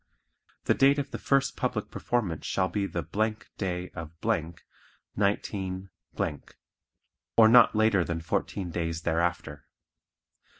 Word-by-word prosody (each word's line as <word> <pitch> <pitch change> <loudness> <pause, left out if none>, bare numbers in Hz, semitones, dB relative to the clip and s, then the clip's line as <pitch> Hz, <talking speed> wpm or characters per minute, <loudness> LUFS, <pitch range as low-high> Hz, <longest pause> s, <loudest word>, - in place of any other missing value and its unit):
The - - +3
date 140 +1 +4
of 145 0 -3
the - - -5
first 135 0 +1
public 125 -4 -2
performance 100 -10 -2
shall 95 -1 +1
be 100 +3 -2
the 85 -3 -3 0.6
day 90 -2 -3
of, 85 -3 -7 1.0
19, 95 -2 -1 1.5
or 110 -1 +9
not 120 0 +7
later 110 -4 +3
than 85 -1 -3
fourteen 85 +2 -2
days 85 -1 -3
thereafter. 85 -4 -1
95 Hz, 115 wpm, -28 LUFS, 85-110 Hz, 1.5 s, or